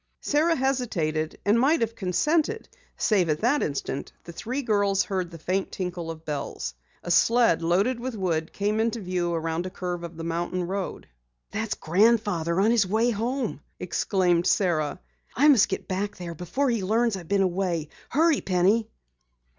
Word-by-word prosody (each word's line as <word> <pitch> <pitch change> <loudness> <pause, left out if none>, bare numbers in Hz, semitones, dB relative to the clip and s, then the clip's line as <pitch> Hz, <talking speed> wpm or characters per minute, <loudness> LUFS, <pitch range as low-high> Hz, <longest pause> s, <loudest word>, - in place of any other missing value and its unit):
Sara 320 +3 +2
hesitated, 210 - -1
and 210 +3 +4
might 290 +5 +3
have 230 0 -1
consented, 305 - 0 0.3
save 190 -6 +2
at 150 - 0
that 275 +6 +2
instant 140 -1 -3
the 170 - -9
three 250 +11 -4
girls 205 -4 +2
heard 185 -3 -2
the 165 - -10
faint 185 +4 -2
tinkle 180 -3 -4
of 165 0 -8
bells. 145 - -4 0.3
A 175 - -3
sled 230 -1 +4
loaded 195 +9 +1
with 250 0 -4
wood 165 -5 -1
came 210 +2 -1
into 230 +1 0
view 180 -3 -2
around 165 +1 -2
a - - -4
curve 180 -2 -4
of 170 -1 -8
the 165 - -5
mountain 175 +2 -2
road. 190 +1 -4 0.4
"That's 220 0 -2
grandfather 185 -2 +2
on 210 +4 +4
his 225 -5 +3
way 225 +5 +2
home!" 240 +5 -2 0.2
exclaimed 180 -3 +1
Sara. 170 -4 +1 0.4
"I 285 +4 +4
must 265 -9 +6
get 190 - -4
back 200 +2 -2
there 175 -2 -6
before 210 - -1
he 225 -4 -1
learns 225 +3 +2
I've 175 -4 -8
been 200 +1 +2
away! 175 -4 -1 0.2
Hurry, 320 +1 +3
Penny!" 200 +5 +2
195 Hz, 170 wpm, -26 LUFS, 170-230 Hz, 0.4 s, must